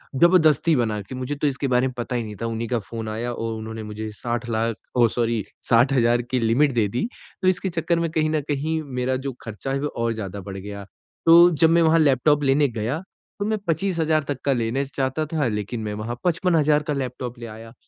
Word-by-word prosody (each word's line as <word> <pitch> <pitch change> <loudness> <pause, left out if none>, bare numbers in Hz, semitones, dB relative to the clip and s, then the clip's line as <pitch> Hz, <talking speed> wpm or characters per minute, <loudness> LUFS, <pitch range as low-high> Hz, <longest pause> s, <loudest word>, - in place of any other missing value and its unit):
जबरदस्ती 165 0 +4
बना 110 -4 0
के 115 +6 -9
मुझे 130 +3 -3
तो 145 +1 0
इसके 140 0 -1
बारे 125 0 +2
में 130 - -5
पता 120 +1 -3
ही 120 - 0
नहीं 105 -1 -7
था - - -1
उन्हीं 115 0 -3
का 120 - +1
फ़ोन 110 +1 -6
आया 115 +3 -3
और 115 -1 -3
उन्होंने 110 0 -6
मुझे 105 +1 -6
60 120 +2 -3
लाख 115 0 0 0.2
ओ 120 -1 +6
सॉरी 115 -2 -1 0.3
60,000 120 0 +4
की 125 +1 -2
लिमिट 120 +6 +3
दे 110 -4 +2
दी 120 - -2 0.3
तो 185 - +1
इसके 185 +1 +1
चक्कर 170 0 0
में 170 - 0
कहीं 155 -1 +1
न 155 -1 0
कहीं 155 +3 -1 0.2
मेरा 130 +1 0
जो 135 - -1
खर्चा 115 +4 -6
है 135 - 0
वो 150 - 0
और 115 -4 -2
ज़्यादा 100 -2 -6
बढ़ 95 0 -7
गया। 100 +1 -7 0.4
तो 170 +1 +8
जब 160 0 +4
मैं 170 +1 +4
वहाँ 165 0 +4
लैपटॉप 145 0 +3
लेने 140 +2 +4
गया 120 +6 -2 0.4
तो 205 - -1
मैं 215 +1 0
25,000 160 -3 +1
तक 140 -2 -4
का 140 - +3
लेने 120 +3 -1
चाहता 135 +2 -2
था 150 -3 -1
लेकिन 105 +1 -3
मैं 105 -1 -3
वहाँ 115 +3 -4
55,000 160 -4 +2
का 150 -1 -2
लैपटॉप 125 -2 -4
ले 120 - -7
आया 115 +1 -10
125 Hz, 225 wpm, -23 LUFS, 115-155 Hz, 0.4 s, तो